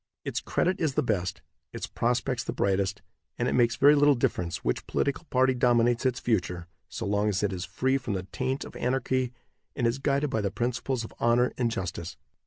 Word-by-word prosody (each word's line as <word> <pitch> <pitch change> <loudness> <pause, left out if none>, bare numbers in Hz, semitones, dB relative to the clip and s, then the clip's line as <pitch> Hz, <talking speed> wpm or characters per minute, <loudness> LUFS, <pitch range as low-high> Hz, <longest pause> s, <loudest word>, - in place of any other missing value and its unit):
Its - - -1
credit 185 +2 0
is 150 -5 0
the - - +2
best, 90 -6 -1 0.3
its - - -4
prospects 125 +1 -1
the - - -3
brightest, 100 0 0 0.3
and - - 0
it - - 0
makes 120 -2 +3
very 145 +2 +6
little 145 -1 +5
difference 85 -8 -1
which - - -1
political 140 +4 -1
party 130 -2 +3
dominates 120 0 +3
its 125 0 -1
future 90 -6 -1 0.2
so - - -5
long 105 +1 +1
as 100 0 0
it 100 -2 +1
is 90 0 -4
free 130 +1 0
from 120 -6 -3
the 95 - -3
taint 130 +1 -2
of - - -11
anarchy 130 0 0 0.4
and 120 - 0
is 115 +3 +1
guided 140 0 +1
by 110 - 0
the 100 - 0
principles 120 +3 -2
of 110 - -9
honor 120 +1 +3
and 120 -2 +1
justice. 95 -5 -4
120 Hz, 200 wpm, -28 LUFS, 100-130 Hz, 0.4 s, very